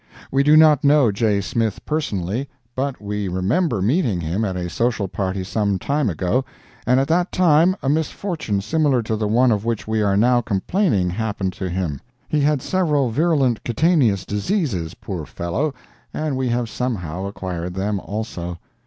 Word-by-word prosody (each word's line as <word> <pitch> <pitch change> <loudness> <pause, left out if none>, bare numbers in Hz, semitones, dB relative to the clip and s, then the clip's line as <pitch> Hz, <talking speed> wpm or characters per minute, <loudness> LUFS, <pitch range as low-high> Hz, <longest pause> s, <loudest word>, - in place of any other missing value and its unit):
We 135 - +3
do 150 +2 +6
not 155 -2 +6
know 140 -5 +5
J. 100 0 +1
Smith 110 +2 -2
personally, 130 - -2 0.3
but 135 0 -2
we 105 -1 -3
remember 100 - 0
meeting 120 - +1
him 85 +6 -2
at 95 -3 -2
a 90 -1 -3
social 110 +1 0
party 95 0 -3
some 100 0 0
time 140 +4 0
ago, 95 - 0 0.4
and 125 +2 +4
at 135 - +1
that 175 +3 +2
time 175 +1 +4
a - - -1
misfortune 155 - -1
similar 145 0 +1
to 110 0 -1
the 105 -1 -1
one 120 +4 +4
of 105 -2 0
which 115 -2 -2
we 110 0 0
are 100 -1 +2
now 120 +3 +4
complaining 105 - 0
happened 100 -2 -2
to 95 0 -4
him. 85 -6 -3 0.3
He 155 - 0
had 145 -2 +2
several 150 -9 +1
virulent 140 -4 +1
cutaneous 120 - +2
diseases, 105 - -1
poor 90 -6 -6
fellow, 85 - -2 0.4
and 155 -3 -1
we 130 -1 -1
have 120 0 0
somehow 95 -8 -3
acquired 90 -3 -5
them, 100 +1 -1
also. 90 -5 -5
110 Hz, 170 wpm, -21 LUFS, 95-145 Hz, 0.4 s, do